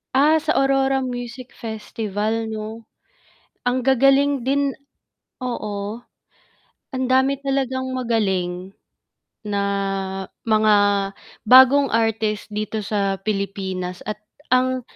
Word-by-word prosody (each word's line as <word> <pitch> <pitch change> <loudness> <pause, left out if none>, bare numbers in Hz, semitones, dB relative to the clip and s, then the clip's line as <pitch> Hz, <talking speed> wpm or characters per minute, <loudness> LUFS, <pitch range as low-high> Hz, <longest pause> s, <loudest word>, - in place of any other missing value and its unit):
Ah, 305 +4 +5
sa 310 0 -1
Aurora 270 0 +2
Music 245 0 -6
Festival 220 0 -3
'no? 220 +1 -6 0.8
Ang 250 +1 +1
gagaling 275 0 +4
din 275 +1 +1 0.7
oo. 210 -3 -4 0.9
Ang 260 -1 -2
dami 265 +2 +2
talagang 265 -2 -1
magaling 190 -6 -1 0.7
na 200 -1 -1 0.8
mga 215 -1 +3 0.7
bagong 260 +3 +7
artist 220 -2 0
dito 215 +1 -3
sa 200 -1 0
Pilipinas, 190 -3 -3
at 215 0 -4 0.3
ang 255 0 +2
230 Hz, 90 wpm, -22 LUFS, 210-265 Hz, 0.9 s, bagong